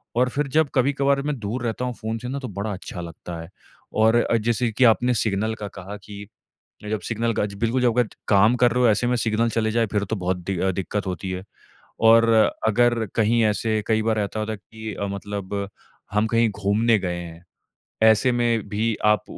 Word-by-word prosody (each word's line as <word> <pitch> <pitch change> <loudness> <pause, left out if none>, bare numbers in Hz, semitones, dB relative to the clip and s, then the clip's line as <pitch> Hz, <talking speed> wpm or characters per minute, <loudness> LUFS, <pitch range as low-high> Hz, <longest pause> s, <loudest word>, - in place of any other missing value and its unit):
और 125 +1 +3
फिर 145 +2 -1
जब 155 -3 +3
कभी-कभार 140 +1 +2
मैं 145 -1 -2
दूर 115 +4 -4
रहता 120 +2 -2
हूँ 125 - -3
फ़ोन 110 +1 -3
से 125 +2 -7
ना 140 +1 -3
तो 130 - -6
बड़ा 100 +1 -4
अच्छा 90 -1 -7
लगता 85 0 -8
है। 80 - -10 0.4
और 110 +1 +4
अ, 120 -1 +2
जैसे 115 +1 0
कि 120 +4 +1
आपने 125 +2 +4
सिग्नल 110 0 0
का - - -3
कहा 100 +3 -7
कि 100 -1 -9 0.6
जब 110 - -1
सिग्नल 115 +1 0
का 105 - 0
ज 100 - -9
बिल्कुल 120 +2 +1
जब 120 - +4
अगर 120 - +3 0.2
काम 110 +4 +5
कर 120 -1 +3
रहे 125 +1 +1
हो - - +6
ऐसे 120 +3 +1
में 125 0 +1
सिग्नल 115 0 +1
चले 110 -1 0
जाएँ 115 0 +1
फिर 100 -1 +1
तो 110 +3 -3
बहुत 90 0 -1
दि 90 +1 -4
अ, 95 - +2
दिक्कत 95 +2 -3
होती 95 +1 -4
है। 90 0 -5 0.6
और 115 +1 +6 0.4
अगर 120 0 +2
कहीं 115 +1 +3
ऐसे 110 +1 0
कई 110 -1 +2
बार 110 -1 +1
ऐसा 105 +1 -2
होता 110 +1 -2
है 110 - -6
कि 110 +3 -9
अ, 100 - -3
मतलब 100 0 -4 0.5
हम 105 +1 +2
कहीं 115 0 +2
घूमने 105 +2 +2
गए 90 -2 -3
हैं, 85 0 -9 0.6
ऐसे 110 +3 +5
में 120 -3 0
भी 110 +1 0
आप 105 -2 +3
110 Hz, 215 wpm, -23 LUFS, 100-120 Hz, 0.6 s, हो